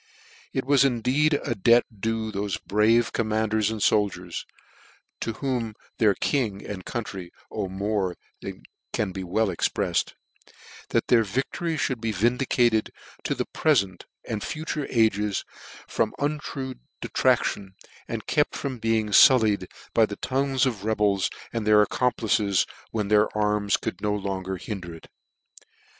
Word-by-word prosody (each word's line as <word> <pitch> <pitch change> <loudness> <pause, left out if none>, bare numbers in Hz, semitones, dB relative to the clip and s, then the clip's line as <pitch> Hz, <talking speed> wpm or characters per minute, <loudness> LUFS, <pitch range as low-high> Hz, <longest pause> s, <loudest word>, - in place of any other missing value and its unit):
" - - -23
It 130 - -2
was 140 0 +5
indeed 135 +4 +2
a - - 0
debt 115 +3 +4
due 110 +1 -1
to 100 - -4
thofe 100 -2 -3
brave 110 +3 +3
com 115 - 0
manders 110 -1 +1
and 110 -1 -3
foldiers 95 -3 +1 0.7
(to 115 - -2
whom 120 -4 -2 0.2
their 105 -3 +4
king 110 -8 -1
and 95 -3 -6
country 95 -6 -5 0.2
owe 105 -3 -2
more 95 -1 -1 0.3
than - - -7 0.3
can 105 -3 0
be 95 +1 -5
wellexprefled) 95 0 0 0.8
that - - +1
their 115 -2 +4
victory 135 - -2
(hould 130 -4 -1
be 115 -1 -1
vindicated 120 +1 +2 0.3
to - - 0
the - - -2
prefent 100 - +1 0.2
and 105 -2 -3
future 155 -2 -3
ages, 105 -3 +1 0.4
from 110 -1 -1
untrue 145 -2 -3 0.3
detraction, 95 -2 0 0.3
and - - -4
kept - - +1
from 130 -3 -4
being 110 -1 +1
fullied 105 -6 +6 0.3
by 110 -1 +4
the 100 - -6
tongues 135 +2 0
of 115 -7 -2
rebels 105 -3 +1 0.2
and 115 -2 -2
their 105 0 +7
accomplices, 105 -4 +1 0.2
when 105 -3 -2
their 105 0 +5
arms 105 -1 +2
could 90 - -5
no 105 -1 0
longer 95 -2 -3
hinder 90 -3 -6
it. 80 - -14
110 Hz, 145 wpm, -25 LUFS, 100-120 Hz, 0.8 s, their